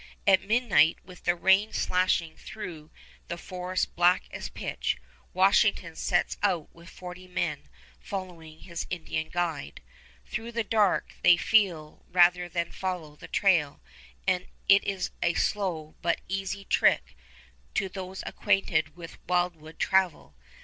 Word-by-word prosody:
At 190 -2 +6
midnight, 205 -8 +3
with 180 -1 -14
the 175 - +3
rain 190 +4 +3
slashing 180 -3 +1
through 180 -7 -8 0.4
the 170 - -4
forest 185 +1 -3
black 175 +1 +4
as - - -6
pitch, - - -3 0.3
Washington 190 -3 +3
sets 175 0 0
out 180 -7 0
with 170 +1 -14
forty 180 0 -10
men, 170 -5 -3 0.3
following 170 -5 -7
his 170 -2 -6
Indian 160 -2 -3
guide. 165 - -3 0.5
Through 230 +2 -5
the 230 0 0
dark 210 -2 +1
they 175 - +7
feel 175 -8 +1
rather 180 0 +4
than 170 0 -2
follow 180 -6 -4
the - - -12
trail, 165 -8 +2 0.5
and 185 -1 +1 0.2
it 200 0 +6
is 195 -2 -2
a 170 -1 +1
slow 170 -7 -1
but 170 0 +1
an - - -24
easy 195 +1 -3
trick - - +2 0.6
to 195 - +1
those 190 0 -7
acquainted 185 -7 +1
with 170 -1 -10
wildwood 175 -3 -1
travel. 190 - +1
180 Hz, 135 wpm, -28 LUFS, 165-190 Hz, 0.6 s, they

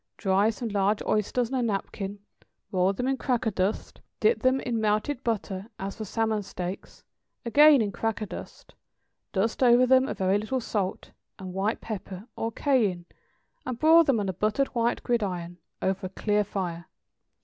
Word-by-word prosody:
= - - -57
Dry 195 +3 +2
some 225 +1 -4
large 205 0 +1
oysters 230 +4 0
on 260 - +1
a - - +1
napkin; 200 -2 -3 0.5
roll 185 0 +2
them 250 +6 -3
in 270 0 +1
cracker 245 -4 0
dust, 190 +2 -2 0.2
dip 445 +2 +3
them 260 0 +3
in 235 -4 -2
melted 215 +5 0
butter 205 -3 -2
as 195 +1 -5
for 220 - -5
salmon 220 +1 0
steaks, 185 -1 -7 0.4
again 285 +1 +6
in 205 - -2
cracker 225 +1 -2
dust, - - -10 0.6
dust 220 +6 -1
over 245 0 +6
them 260 +1 +4
a - - -3
very 190 +1 +1
little 235 +5 -2
salt 205 -5 -3 0.3
and 185 -1 -8
white 195 +4 -1
pepper, 200 -2 -6
or 225 - -2
cayenne, 215 -10 +1 0.6
and 255 - -4
broil 325 +4 +6
them 275 -7 +2
on 200 - -2
a 190 - -1
buttered 215 +9 0
wire 235 -1 +1
gridiron, 180 -7 -2 0.2
over 190 0 -1
a - - -11
clear 210 +2 0
fire. 175 -4 -4
215 Hz, 170 wpm, -27 LUFS, 195-240 Hz, 0.6 s, again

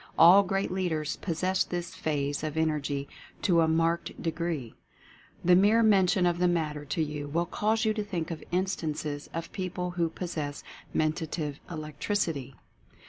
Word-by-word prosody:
All 175 +5 +9
great 195 0 -1
leaders 165 -5 -1
possess 185 +2 0
this 175 -1 -4
phase 145 -1 -2
of 155 0 -3
Energy 145 -3 0 0.4
to 170 -3 +4
a 160 - +4
marked 165 +1 0
de 165 - -1
gree. 160 -9 -3 0.7
The 180 0 +7
mere 210 +5 +5
mention 190 -3 +4
of 175 -1 +1
the 180 - +4
matter 155 -4 -1
to 155 +3 0
you 150 -1 -4
will 170 +4 0
cause 220 +5 0
you 215 - +3
to 215 -1 -2
think 175 -5 -3
of 160 - -6
instances 155 -5 -2
of 165 0 -5
people 180 -2 -3
who 170 -2 0
pos 175 +1 -5
sess 145 -2 -4 0.3
Mentative 155 -2 -1
"Electricity." 155 - -2
165 Hz, 160 wpm, -29 LUFS, 150-180 Hz, 0.7 s, All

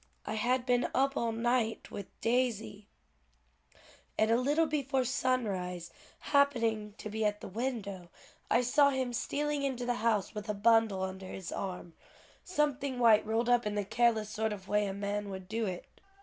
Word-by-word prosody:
I - - -3
had 245 +3 +1
been 245 -1 +2
up 275 +1 +2
all 235 -3 0
night 230 0 0
with 200 - -6
Daisy, 225 -4 0 1.3
and 220 +1 +3
a - - +5
little 290 +7 +2
before 275 -4 0
sunrise 205 -9 -1 0.4
happening 230 -7 +2
to - - -7
be 220 +1 -2
at 210 0 +1
the - - -8
window, 200 -5 -4 0.4
I 235 - +4
saw 280 +4 +4
him 260 -3 -1
stealing 295 +4 -1
into 260 -3 -2
the 245 - +1
house 220 -4 +1
with 210 0 -6
a 210 - 0
bundle 220 -2 +3
under 190 0 -5
his 185 -1 -7
arm, 180 -3 -5 0.5
something 285 -6 -1
white 230 -3 +6
rolled 225 +2 +1
up 245 -2 +3
in 210 - -2
the 205 -1 -1
careless 220 0 +2
sort 220 +1 -1
of 190 -2 -9
way 210 0 +2
a 195 - -3
man 205 0 -3
would 190 -1 -7
do 220 +2 -1
it." 180 -2 -5
225 Hz, 175 wpm, -31 LUFS, 205-255 Hz, 1.3 s, white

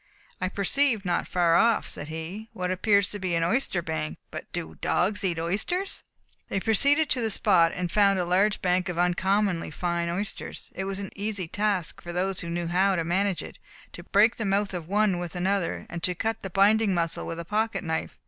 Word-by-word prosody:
"I 185 - 0
perceive 215 +3 +1
not 175 -1 0
far 170 -2 +3
off," 230 +2 +3
said 145 - -6
he, 165 +8 -6
"what 180 -3 -2
appears 200 +1 +2
to 205 - -5
be 185 -2 -1
an 165 - +1
oyster 180 -2 0
bank, 155 -1 -3
but - - -8
do 80 - -4
dogs 200 +4 +1
eat 175 -3 0
oysters?" 210 - -2 0.5
They 195 - 0
proceeded 280 +9 +4
to 250 - +3
the 225 - +1
spot, 170 -4 +3
and 180 -1 -3
found 200 -1 +4
a 180 - 0
large 195 +4 +2
bank 180 0 +1
of 175 - -4
uncommonly 185 +1 +1
fine 170 +1 -2
oysters. 195 +4 -5
It 190 - -4
was 195 0 -3
an 200 -1 -6
easy 200 -3 -2
task 195 -2 -1
for 175 - -7
those 185 +2 0
who 170 - -4
knew 170 0 -2
how 185 +3 +2
to 170 - 0
manage 190 +2 0
it, - - -11 0.3
to - - -8
break 210 +5 +3
the 225 - -2
mouth 200 0 0
of 170 -3 -5
one 200 -1 +2
with 175 -1 -6
another 185 0 -1
and 170 - -6
to 180 +1 0
cut 225 +4 -2
the 195 - -5
binding 200 +2 +3
muscle 165 -1 -1
with 165 - -5
a 170 - -5
pocket 215 +4 -1
knife. 160 -2 -3
185 Hz, 210 wpm, -26 LUFS, 175-205 Hz, 0.5 s, proceeded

